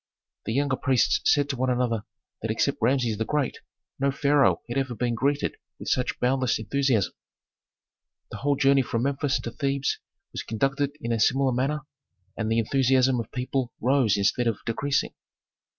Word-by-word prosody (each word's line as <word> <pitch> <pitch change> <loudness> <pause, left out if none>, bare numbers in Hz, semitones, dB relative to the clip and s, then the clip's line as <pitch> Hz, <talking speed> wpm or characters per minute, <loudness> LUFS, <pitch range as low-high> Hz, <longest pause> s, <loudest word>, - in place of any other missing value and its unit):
The 110 - -2
younger 140 0 +1
priests 130 -4 +2
said 145 -1 +3
to 135 - -1
one 130 +1 0
another 120 -3 0 0.4
that - - -3
except - - 0
Rameses 120 -3 +1
the - - +1
Great 145 +2 -1 0.4
no 140 +1 +2
pharaoh 140 +1 +2
had 120 - -5
ever 130 -3 -2
been 120 +1 -1
greeted 140 +5 0 0.2
with - - -6
such 125 -1 0
boundless 130 0 +1
enthusiasm. 115 -2 0 1.2
The - - -6
whole 145 0 +1
journey 140 0 +4
from 115 -2 -2
Memphis 140 0 0
to 115 - -5
Thebes 140 +1 -1 0.3
was - - -4
conducted 135 +5 -1
in 115 - -3
a 115 - 0
similar 135 +4 +3
manner 135 +5 0 0.5
and 110 -1 -2
the 115 - +2
enthusiasm 130 +2 +3
of 115 - -6
people 125 -1 -2
rose 125 -4 +3
instead 105 +5 +1
of 115 -3 0
decreasing. 140 +5 -1
130 Hz, 165 wpm, -26 LUFS, 115-140 Hz, 1.2 s, journey